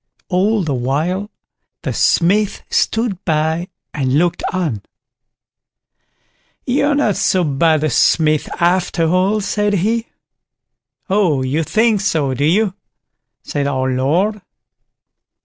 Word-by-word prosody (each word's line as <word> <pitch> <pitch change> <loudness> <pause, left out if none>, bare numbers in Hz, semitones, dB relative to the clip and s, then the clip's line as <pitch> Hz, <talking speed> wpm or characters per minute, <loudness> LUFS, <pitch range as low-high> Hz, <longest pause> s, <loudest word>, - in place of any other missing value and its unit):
All 200 +3 +1
the 150 -4 -2
while, 155 +11 -1 0.5
the - - -2
Smith 200 +4 +1
stood 220 -5 0
by 160 +2 0 0.3
and 135 -2 0
looked 175 +1 +1
on. 160 - -2 1.8
"You're 285 +3 +1
not 220 -9 +1
so 185 -1 +2
bad 155 +1 +1
a 155 - +1
smith 155 +4 +2
after 175 -1 +1
all", 185 +5 +1
said 205 +1 -1
he. 225 +5 0 1.0
"Oh, 180 -9 +1
you 140 +5 0
think 220 +4 +1
so, 155 -9 0
do 140 +3 -1
you?" 190 +5 +2 0.7
said 140 -1 -2
our 130 -1 -1
Lord. 170 +12 0
175 Hz, 115 wpm, -17 LUFS, 150-205 Hz, 1.8 s, so